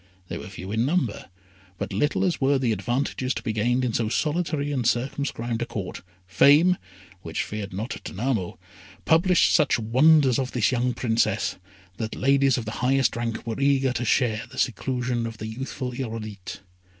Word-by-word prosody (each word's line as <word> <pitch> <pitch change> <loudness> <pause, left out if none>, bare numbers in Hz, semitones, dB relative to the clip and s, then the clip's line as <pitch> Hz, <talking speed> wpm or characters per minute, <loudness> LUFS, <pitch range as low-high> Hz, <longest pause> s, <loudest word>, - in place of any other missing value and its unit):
They - - -4
were - - -8
few 95 0 -8
in 110 +2 +1
number, 135 - -1 0.5
but - - -4
little 145 - +1
as 175 -5 -1
were 135 +1 +3
the 125 -3 0
advantages 125 +5 -1
to - - -5
be 110 - -2
gained 120 +4 +1
in 120 - -1
so 110 -1 0
solitary 150 +2 -1
and 130 -4 -1
circumscribed 120 -1 -1
a - - 0
Court, 95 -4 -5 0.2
Fame, 150 - +5 0.4
which 80 -2 -3
feared 105 -2 -5
not 105 +6 -5
Danamo, 110 -3 -2 0.5
published 175 +2 +4
such 155 -4 +4
wonders 130 +4 +4
of 130 -1 -3
this 120 -1 +2
young 125 0 0
Princess, 110 -3 0 0.4
that 110 -1 -4
ladies 135 -1 +3
of 120 - -4
the 110 - -4
highest 130 -1 +2
rank 115 0 -3
were 115 +2 -4
eager 135 -2 +3
to 120 - -2
share 120 -1 +1
the - - -13
seclusion 125 -1 -1
of 115 -1 -8
the 110 - -6
youthful 125 +3 -5
Irolite. 110 -7 -6
125 Hz, 175 wpm, -25 LUFS, 110-135 Hz, 0.5 s, Fame